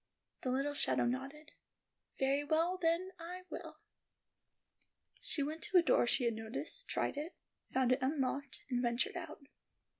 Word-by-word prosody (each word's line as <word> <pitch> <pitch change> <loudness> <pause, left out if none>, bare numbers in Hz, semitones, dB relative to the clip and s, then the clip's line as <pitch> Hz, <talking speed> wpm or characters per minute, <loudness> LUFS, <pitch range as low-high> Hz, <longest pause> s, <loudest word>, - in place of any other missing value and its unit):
The 255 - -1
little 275 +3 +1
shadow 285 - +2
nodded. 270 +5 -3 0.7
"Very 275 +2 +2
well, 330 +5 +2
then, 340 +3 +2
I 360 +2 -6
will." 320 -2 -6 1.4
She 285 - 0
went 310 +3 -3
to 375 - +4
a 350 - +7
door 250 -5 +4
she 250 - +2
had 235 -1 +2
noticed, 225 - -4
tried - - 0
it, 305 +4 -4 0.4
found 255 -1 +3
it 255 +1 +3
unlocked, 275 0 -1
and 245 -1 +2
ventured 240 0 +1
out. - - -6
285 Hz, 150 wpm, -36 LUFS, 255-330 Hz, 1.4 s, a